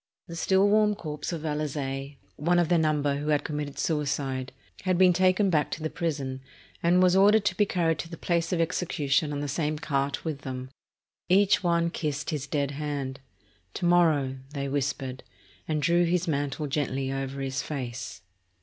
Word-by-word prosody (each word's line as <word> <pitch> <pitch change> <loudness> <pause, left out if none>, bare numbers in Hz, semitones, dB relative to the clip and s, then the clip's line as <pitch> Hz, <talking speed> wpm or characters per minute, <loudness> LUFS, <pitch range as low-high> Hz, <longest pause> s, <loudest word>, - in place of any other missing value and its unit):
The 170 - -7
still 190 +3 +3
warm 210 0 +4
corpse 150 -4 -5
of 165 -3 -4
Valaze, 145 -2 -3 0.2
one 170 +4 +1
of 175 -2 +2
their 175 -2 +4
number 145 -3 +1
who 145 +1 -4
had 150 -1 +2
committed 150 -2 -4
suicide, 140 -4 -1 0.3
had 185 -2 +1
been 185 -1 +6
taken 185 +2 +3
back 150 -3 +2
to 155 - -5
the 155 - -2
prison, 140 -6 -3 0.4
and 180 +2 +4
was 180 0 +4
ordered 205 +2 +5
to - - +1
be 205 - +2
carried 165 -4 +1
to 165 - -5
the 165 - -8
place 170 -1 0
of 180 - 0
execution 155 -3 0
on 145 -1 -3
the 145 - -2
same 150 +1 -1
cart 140 0 -2
with 155 -3 -3
them. 130 -1 -6 0.6
Each 195 +2 +4
one 170 -1 +2
kissed 150 -2 -3
his 145 -3 -3
dead 140 -1 -1
hand. 140 -2 -4 0.6
"To 180 - -2
morrow," 155 -7 +3 0.2
they 140 0 -2
whispered, 135 -2 -2 0.5
and 155 -2 -1
drew 170 +4 +4
his 175 +1 0
mantle 145 -1 -1
gently 135 -2 -1
over 135 0 -4
his 135 -1 -2
face. 125 -9 -5
150 Hz, 180 wpm, -27 LUFS, 140-170 Hz, 0.6 s, been